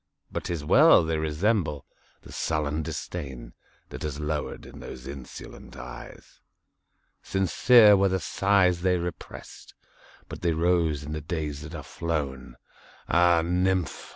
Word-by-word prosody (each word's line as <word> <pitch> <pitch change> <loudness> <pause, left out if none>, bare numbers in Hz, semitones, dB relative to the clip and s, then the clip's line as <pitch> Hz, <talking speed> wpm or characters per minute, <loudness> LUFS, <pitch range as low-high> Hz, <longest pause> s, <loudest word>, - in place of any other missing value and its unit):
But - - -4
't - - -2
is 75 -3 -5
well!—they 80 +1 +5
resemble 80 - 0 0.4
the - - -13
sullen 75 -1 -1
disdainThat 65 -7 -8
has 75 -1 -4
lowered 75 0 -4
in - - -12
those 65 - -9
insolent 70 -1 -10
eyes. 60 0 -11 0.8
Sincere 105 +4 +5
were 100 0 +3
the 95 0 0
sighs 95 -2 +2
they 90 0 +2
represt, 85 -1 -8 0.5
But - - -9
they 85 -2 +1
rose 80 -3 +1
in 75 - -7
the 75 0 -4
days 75 -3 -4
that 75 0 -8
are - - -7
flown! 70 -7 -4 0.5
Ah, 85 -1 +4
nymph! 90 -1 -1
80 Hz, 130 wpm, -26 LUFS, 75-90 Hz, 0.8 s, well!—they